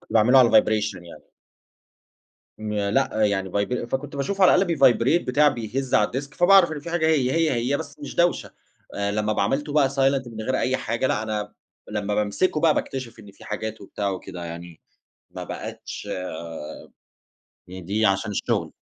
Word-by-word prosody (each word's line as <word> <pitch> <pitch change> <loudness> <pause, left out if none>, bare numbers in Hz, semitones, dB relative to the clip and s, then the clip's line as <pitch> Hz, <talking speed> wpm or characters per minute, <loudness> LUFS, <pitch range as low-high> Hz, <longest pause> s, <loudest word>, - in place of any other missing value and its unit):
كنت - - -15
باعمله 115 +4 +5
على 125 -2 +6
الvibration 110 -1 +3
يعني. 85 - -13 1.3
ما 105 -2 -2
لأ، 110 -3 +1
يعني 95 -2 0
vibr 110 +5 -1
فكنت 135 +3 -4
باشوفه 190 +8 +1
على - - +6
الأقل 175 -4 +2
بيvibrate، 135 +4 +4
بتاع، 145 +4 +4
بيهَز 125 +2 -3
على 105 -1 +3
الdesk، 140 +3 -5
فباعرف 180 -1 +5
إن 150 - -5
في 165 +3 -8
حاجة 170 -2 +1
هي 140 -5 +2
هي 165 -1 +2
هي 125 +4 0
بس 145 - -8
مش 145 - -7
داوشة. 175 0 +1 0.4
آآ، 100 0 -1
لمّا 105 0 0
ب - - -1
عملته 140 +8 -1
بقى 145 -3 +4
silent 135 0 +2
من 110 -1 -8
غير 130 +3 -1
أي 130 +1 +1
حاجة، 115 +4 -2
لأ 105 - 0
أنا 105 -1 -4 0.4
لمّا 105 -1 -2
بامسِكه 105 - 0
بقى 160 -2 +4
باكتشف 130 -3 -4
إن 105 -2 -13
في 100 - -17
حاجات 110 +1 -5
وبتاع 100 0 -3
وكده، 90 -2 -7
يعني 85 0 -9 0.5
ما - - -7
بقِتش - - -7 1.6
يضيع 95 +4 0
عشان 100 +2 -3
الشغل. - - -2
120 Hz, 175 wpm, -24 LUFS, 105-140 Hz, 1.6 s, على